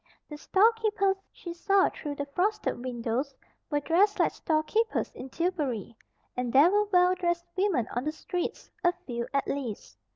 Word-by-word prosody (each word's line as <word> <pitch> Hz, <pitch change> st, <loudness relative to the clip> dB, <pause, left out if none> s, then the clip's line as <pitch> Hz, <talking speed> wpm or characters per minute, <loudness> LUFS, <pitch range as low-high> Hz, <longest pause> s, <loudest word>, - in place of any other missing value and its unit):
The 300 Hz, -, -6 dB
storekeepers 420 Hz, -1 st, +3 dB
she 345 Hz, -, -8 dB
saw 390 Hz, +3 st, +3 dB
through 295 Hz, -2 st, -6 dB
the 285 Hz, -, -3 dB
frosted 360 Hz, -, -1 dB
windows 250 Hz, +2 st, -2 dB, 0.3 s
were 295 Hz, -2 st, 0 dB
dressed 385 Hz, +7 st, +3 dB
like -, -, +3 dB
storekeepers 325 Hz, +9 st, 0 dB
in 260 Hz, -, -8 dB
Tillbury; 280 Hz, -, -2 dB, 0.4 s
and 250 Hz, -1 st, -2 dB
there 285 Hz, +8 st, +6 dB
were 415 Hz, +1 st, +3 dB
well 360 Hz, -2 st, +4 dB
dressed 345 Hz, -1 st, -1 dB
women 370 Hz, -, +1 dB
on 245 Hz, +3 st, -1 dB
the 305 Hz, -, 0 dB
streets, 350 Hz, +3 st, -4 dB
a 350 Hz, 0 st, +4 dB
few, 235 Hz, -1 st, -3 dB
at 275 Hz, -1 st, +1 dB
least. 255 Hz, -7 st, -5 dB
335 Hz, 160 wpm, -28 LUFS, 265-385 Hz, 0.4 s, there